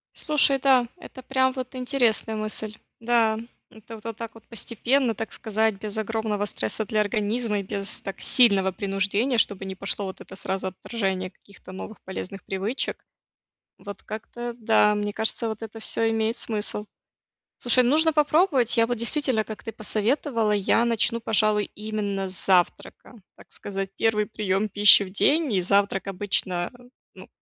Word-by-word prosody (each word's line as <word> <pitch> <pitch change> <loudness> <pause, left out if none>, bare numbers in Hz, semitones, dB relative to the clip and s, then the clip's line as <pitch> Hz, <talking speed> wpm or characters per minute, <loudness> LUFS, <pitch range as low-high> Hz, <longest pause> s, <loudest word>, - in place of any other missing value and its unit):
Слушай, 280 -3 +3
да, 255 -3 +4
это 260 -7 -12
прям 260 0 +1
вот 255 0 -6
интересная 245 -4 +1
мысль. 215 0 -3 0.2
Да, 225 -2 +2 0.3
это 220 0 -12
вот 230 -1 -5
так 230 0 -8
вот 225 - -17
постепенно, 235 +2 0
так 225 - -6
сказать, 220 -1 0
без 215 0 -4
огромного 220 -1 -2
стресса 195 - -3
для 215 +1 0
организма 210 +1 -1
и - - -4
без 195 0 -2
так 195 - -7
сильного 200 -7 +4
принуждения, 200 +6 0
чтобы 200 -2 0
не 190 - -5
пошло 195 +1 -2
вот 190 - -8
это 190 - -11
сразу 190 0 -3
отторжение 190 -1 -3
каких-то 195 -1 -16
новых 205 +3 -8
полезных 190 0 -7
привычек. 195 +7 -3 0.8
Вот 205 -2 -10
как-то 235 +2 -6
да, 215 -2 +3
мне 205 0 -2
кажется, 220 +1 +1
вот 220 0 -6
это 225 0 -10
всё 225 +1 +2
имеет 225 +1 0
смысл. 210 -2 0 0.7
Слушай, 250 +1 +3
нужно 310 +6 +4
попробовать. 300 - +3
Я 230 0 +4
вот 240 -1 -2
действительно, 250 -1 +1
как 215 0 -9
ты 225 - -5
посоветовала, 225 +1 0
я 210 +3 +2
начну, 235 0 +1
пожалуй, 215 -1 +2
именно 205 -2 -3
с 185 -2 -7
завтрака. 190 +4 0 0.2
Так - - -18
сказать, 195 -1 -5
1 210 -2 +1
прием 210 -1 -1
пищи 205 0 +7
в 190 - -7
день, 290 - +2
и 190 - +2
завтрак 200 +1 +1
обычно, 185 -2 -1 0.4
ну, - - -13
220 Hz, 160 wpm, -25 LUFS, 200-235 Hz, 0.8 s, пищи